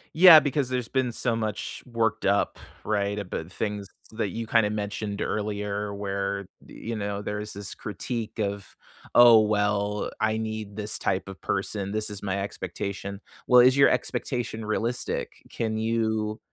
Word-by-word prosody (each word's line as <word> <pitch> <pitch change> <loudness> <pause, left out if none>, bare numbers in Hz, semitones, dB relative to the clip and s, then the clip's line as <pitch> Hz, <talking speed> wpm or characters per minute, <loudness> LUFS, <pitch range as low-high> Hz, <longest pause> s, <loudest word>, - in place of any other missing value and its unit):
Yeah, 170 -1 +10
because 145 -3 0
there's 125 -2 -1
been 130 -2 0
so 115 0 0
much 110 -2 -4
worked 115 -3 -1
up, 100 +1 +2 0.3
right, 100 -1 0
about 90 -4 -5
things 105 -1 -3 0.2
that 110 -2 -2
you 115 +4 -5
kinda 110 -2 +3
mentioned 105 0 -3
earlier 105 -1 -2
where, 100 -1 -3 0.2
you 115 0 -6
know, 100 -1 -3
there 105 0 -3
is 105 0 -5
this 100 -1 -4
critique 110 +3 -5
of, 100 -1 -3 0.4
"Oh, 120 -2 +9
well, 105 -1 +1
I 110 0 +1
need 110 -2 -5
this 105 0 -2
type 95 0 -1
of 95 - -9
person. 100 0 -2
This 110 0 -1
is 100 -1 -6
my 100 0 -1
expectation." 100 0 -5 0.2
Well, 125 -1 +7
is 130 +2 +5
your 140 - +7
expectation 120 -4 -2
realistic? 115 +3 -2
Can 110 -1 -2
you 110 -1 0
105 Hz, 155 wpm, -26 LUFS, 100-115 Hz, 0.4 s, Yeah